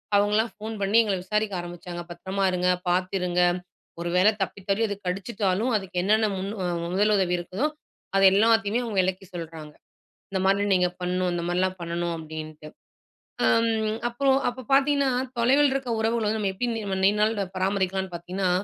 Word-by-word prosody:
அவங்கள்லாம் 210 +3 +2
ஃபோன் 220 +1 -6
பண்ணி 200 +3 +3
எங்கள 200 -3 -1
விசாரிக்க 210 +1 -1
ஆரம்பிச்சாங்க. 175 0 -7
பத்திரமா 190 +3 -3
இருங்க, 180 0 +1 0.2
பார்த்து 185 +1 0
இருங்க. 180 0 +1 0.6
ஒரு 170 - -2
வேளை 205 +4 +6
தப்பித் 195 0 -8
தவறி 200 +3 +2
அது 205 - -3
கடிச்சுட்டாலும், 195 +3 -1
அதுக்கு 190 -3 -7
என்னென்ன 215 +2 +3
முன் 195 +2 -3 0.4
முதலுதவி 195 -2 +2
இருக்குதோ, 190 - -2 0.5
அது 195 - +4
எல்லாத்தையுமே 225 +2 +3
அவங்க 225 -4 -4
விளக்கி 190 +1 -2
சொல்றாங்க. 160 -3 -7 0.6
"இந்த 190 -1 -1
மானி 195 +1 +3
நீங்க 180 -1 +3
பண்ணணும், 180 0 0
இந்த 170 - -2
மாரில்லாம் 185 +1 0
பண்ணணும்." 170 0 -2
அப்படீன்ட்டு. 155 -1 -8 0.8
அம் 220 - +1
அப்பறம் 270 +2 +2
அப்போ 255 +1 -8
பார்த்தீங்கன்னா, 280 0 +3 0.3
தொலைவில 270 +4 +4
இருக்க 270 -2 -3
உறவுகள 225 0 0
வந்து 220 +1 0
நம்ம 200 -2 0
எப்படி 245 +6 -2
நீ 225 - -3 0.2
நீண்ட 210 +1 +3
நாள் 205 -4 0
பராமரிக்கலாம்ன்னு 190 -1 -1
பார்த்தீங்கன்னா, 180 +2 -2
195 Hz, 160 wpm, -25 LUFS, 180-220 Hz, 0.8 s, வேளை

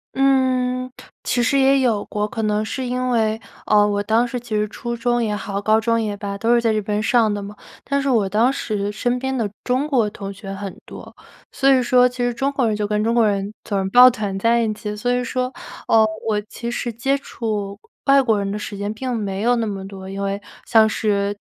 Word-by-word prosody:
嗯， 255 -2 +1 0.3
其 245 - 0
实 275 +4 +2
也 270 0 +4
有 230 -5 +1
过。 210 0 -2
可 225 - -5
能 215 0 0
是 260 +3 -4
因 250 +1 -1
为， 220 -1 +1 0.3
呃， 210 -1 +4
我 205 0 -1
当 225 +3 +2
时 250 -1 -4
其 245 0 -10
实 210 0 +1
初 235 +2 -5
中 240 0 0
也 210 -2 -1
好、 200 -1 -4
高 215 +1 +3
中 230 0 +1
也 205 -2 -3
罢， 200 -1 -5
都 230 +3 +2
是 235 - +4
在 225 -2 +2
这 215 - 0
边 210 +1 -2
上 225 -3 +3
的 205 - -3
嘛。 205 +1 -8 0.3
但 280 +1 0
是 275 - -1
我 220 -6 +2
当 225 +6 +2
时 205 -6 -3
身 245 +3 -1
边 265 +1 -2
的 215 -3 -1
中 260 +4 0
国 240 -8 +2
同 200 -1 -7
学 195 -1 -8
很 195 -1 -7
多。 - - -11 0.4
所 275 - +2
以 255 - +4
说 250 0 +4
其 250 - -13
实 245 -1 0
中 270 +4 -1
国 260 -4 0
人 215 - 0
就 210 0 -1
跟 210 0 0
中 230 +1 +1
国 235 - +4
人 200 0 -1
总 200 -2 -1
是 190 - -2
抱 250 +4 +9
团 210 -5 -3
在 230 +3 +2
一 220 -2 0
起。 210 0 -5
所 245 +4 -2
以 250 0 0
说， 255 +1 -2 0.3
呃， 220 -1 +5 0.2
我 210 -1 +1
其 235 +3 -7
实 240 0 -3
接 270 +5 0
触 210 -6 -4 0.3
外 275 0 +6
国 225 -5 +2
人 200 0 -2
的 210 - -3
时 205 -1 -6
间 205 +1 -3
并 250 +2 -3
没 200 -2 -3
有 245 +1 +3
那 230 -1 -1
么 195 -2 -5
多， 190 -1 -9
因 195 +1 -5
为 200 +1 -2 0.2
像 220 -1 +5
是 205 -2 -1
220 Hz, 255 characters per minute, -21 LUFS, 205-250 Hz, 0.4 s, 抱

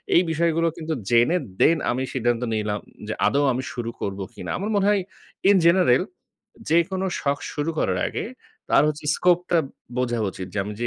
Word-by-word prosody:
এই 175 - +7
বিষয়গুলো 165 +1 +1
কিন্তু 160 0 -3 0.2
জেনে 120 +9 +4 0.2
then 165 0 +5
আমি 130 +2 -1
সিদ্ধান্ত 120 -2 0
নিলাম 105 -1 -1 0.3
যে 110 - -2
আদৌ 140 +1 +2
আমি 130 +2 -3
শুরু 120 -3 -4
করব 100 0 -3
কিনা। - - -8
আমার 200 +4 -3
মনে 200 -1 +2
হয় 205 -2 +3 0.5
in 205 - +6
general 170 -8 +5 0.7
যেকোনো 185 +3 +2
শখ 140 0 0
শুরু 150 +2 -2
করার 90 -1 +1
আগে - - -4 0.5
তার - - +6
হচ্ছে 150 0 -4
স্কোপটা 180 -1 +2 0.4
বোঝা 120 -2 0
উচিত 95 - -7
যে - - -2
আমি 105 - -5
যে 120 - 0
145 Hz, 175 wpm, -24 LUFS, 120-170 Hz, 0.7 s, এই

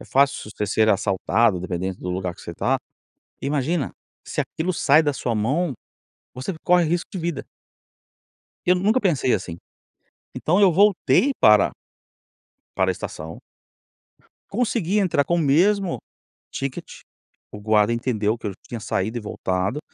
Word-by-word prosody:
é - - -10
fácil 135 -5 +1
você 105 0 -3
ser 110 +2 +2
assaltado, 100 0 +2
dependendo 95 0 -3
do 90 - -5
lugar 90 -1 -3
que - - -16
você 85 - -8
tá. 130 +9 +1 0.7
Imagina, 145 +2 -1 0.3
se - - -1
aquilo 175 +3 -3
sai 150 0 +4
da 145 -1 0
sua 120 -3 -2
mão, 140 +9 0 0.6
você 130 +9 -4
corre 180 -1 +4
risco 170 +2 -1
de 190 - -4
vida. 170 -2 -3 1.2
Eu 180 - +5
nunca 210 +7 +2
pensei, 150 - +1
assim. 90 -4 -2 0.8
Então 180 +6 +1
eu 190 -3 +6
voltei 205 - +3
para 105 -2 +6 1.0
para - - +2
estação 80 +2 -7 1.1
consegui 210 -3 0
entrar 170 -8 +2
com 170 - 0
o - - +1
mesmo 180 +6 +2 0.5
ticket, 135 -1 -4 0.7
o 105 - -8
guarda 105 +1 +3
entendeu 115 -2 -1
que 110 - -7
eu 100 - -2 0.2
tinha 115 -2 -5
saído 110 +4 -2
e - - -6
voltado, 95 +5 -2
130 Hz, 145 wpm, -23 LUFS, 105-175 Hz, 1.2 s, eu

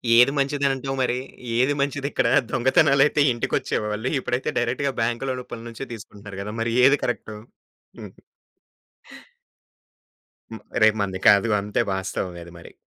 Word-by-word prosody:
ఏది 125 +3 +6
మంచిదనంటావు 135 -1 0
మరి? 125 -1 0 0.4
ఏది 130 +4 +3
మంచిదిక్కడ? 140 0 -1 0.2
దొంగతనాలైతే 140 +3 +3
ఇంటికొచ్చేవాళ్ళు, 110 0 -2
ఇప్పుడైతే 125 +2 -2
డైరెక్ట్‌గా 140 -1 -1
బాంక్‌లో 120 +3 -1
రూపంలో 120 -1 -9
నుంచే 115 +4 -7
తీసుకుంటున్నారు 100 -2 -10
కదా! 105 +2 -6
మరి 115 0 -1
ఏది 140 +2 +5
కరెక్టు. 110 -3 -4 0.6
హుహు. - - -12 2.3
హ్మ్. 110 - -8 0.2
రేపు 110 0 +5
మనది 95 -2 -2
కాదు. 100 +3 +4
అంతే 105 +1 -1
వాస్తవమే 95 -2 -4
అది 85 - -13
మరి. - - -14
120 Hz, 120 wpm, -23 LUFS, 105-135 Hz, 2.3 s, ఏది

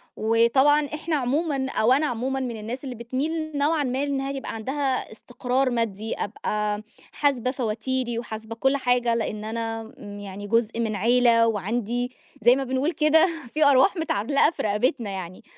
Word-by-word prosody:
وطبعًا 265 +7 +3
إحنا 305 +2 -3
عمومًا 275 +1 0
أو 235 +4 +3
أنا 295 +3 +2
عمومًا 255 +3 -2
من 240 -4 -3
الناس 240 +6 -6
اللي 255 -2 -5
بتميل 295 +6 -3
نوعًا 295 +1 +2
ما 260 +2 -1
إنها 275 -1 -2
يبقى 270 -3 -5
عندها 265 +3 -2
استقرار 250 +3 -1
مادي، 225 -2 -2
أبقى 210 0 -2 0.3
حاسبة 255 -4 +1
فواتيري، 240 0 -2
وحاسبة 220 0 -7
كل 270 +3 +2
حاجة 245 -2 +2
لأن 215 -2 -3
أنا 225 0 -4
امم 205 0 -8
يعني 205 0 -7
جزء 230 +1 +1
من 220 -2 -1
عيلة، 230 +2 +4
وعندي 230 +4 -1 0.3
زي 240 +3 +6
ما 270 - -1
بنقول 265 +5 0
كده 320 +3 +4 0.3
فيه 300 -2 +4
أرواح 270 +9 +4
متعلقة 285 0 +2
في - - -5
رقبتنا 215 +2 0
يعني، 185 -2 -7
245 Hz, 160 wpm, -25 LUFS, 225-275 Hz, 0.3 s, زي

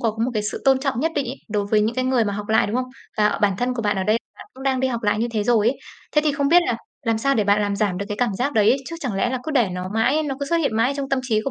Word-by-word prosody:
có 230 - +1
một 255 - -1
cái 215 - 0
sự 210 - -4
tôn 270 -1 +5
trọng 270 -4 -1
nhất 325 +3 0
định 280 -2 -1
ấy, 255 +3 -5
đối 205 -1 -1
với 215 -1 +4
những 220 +3 0
cái 255 - 0
người 255 -3 +2
mà 205 - -1
học 205 +1 -5
lại, 220 - +3
đúng 215 - -2
không? 255 0 -1 0.3
Và 210 -1 +2
bản 200 -2 +3
thân 250 +1 0
của 235 - -3
bạn 205 -2 0
ở 190 - 0
đây 215 +3 +2 0.2
bạn - - -12
cũng 265 - -11
đang 265 -1 +1
đi 265 - +1
học 235 -2 -3
lại 210 0 +1
như 235 - +1
thế 215 -2 0
rồi 225 -1 +3
ấy. 275 - -2 0.3
Thế 300 - +4
thì 300 - +2
không 280 0 0
biết 350 +3 +6
là 235 - 0 0.3
làm 225 -1 +2
sao 275 +3 +1
để 215 - +1
bạn 205 +1 +3
làm 205 -1 -1
giảm 200 -3 0
được 200 - -4
cái 205 - -3
cảm 240 -4 0
giác 280 +4 0
đấy? 220 +3 +4
Chứ 335 - -6
chẳng 250 -9 -3
lẽ 220 +5 0
là 260 - -1
cứ 315 - -3
để 245 -9 +2
nó 180 0 -4
mãi, 260 +8 +2
nó 280 -3 -2
cứ 280 - -2
xuất 335 - +1
hiện 280 -9 0
mãi 230 +4 +2
trong 275 -1 -3
tâm 270 -1 +1
trí 225 -4 +1
của 275 - -1
235 Hz, 360 wpm, -22 LUFS, 210-270 Hz, 0.3 s, biết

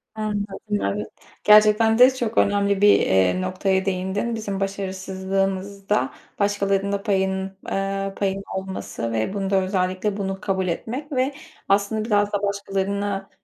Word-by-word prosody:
Anladım, 210 -1 -3
evet. 100 +1 -2 0.4
Gerçekten 215 +1 +6
de 255 +1 +8
çok 235 -3 -3
önemli 200 -1 +2
bir, 205 0 +5 0.3
ııı, 185 - -2
noktaya 190 +1 0
değindin. 195 +4 -1
Bizim 205 -3 -4
başarısızlığımızda 195 +1 -2 0.3
başkalarının 200 -1 +1
da 200 0 -2
payının, 190 -1 -1
ııı, 195 0 -2
payının 195 0 -1
olması 190 -11 -4
ve 110 - -1
bunu 195 -1 -2
da 195 - +2
özellikle 185 +2 -1
bunu 195 -1 -3
kabul 190 -3 -1
etmek 250 - -4
ve 265 +1 0 0.4
aslında 205 +2 +1
biraz 205 -2 +1
da 205 0 -1
başkalarına, 200 0 -2
195 Hz, 135 wpm, -23 LUFS, 190-205 Hz, 0.4 s, de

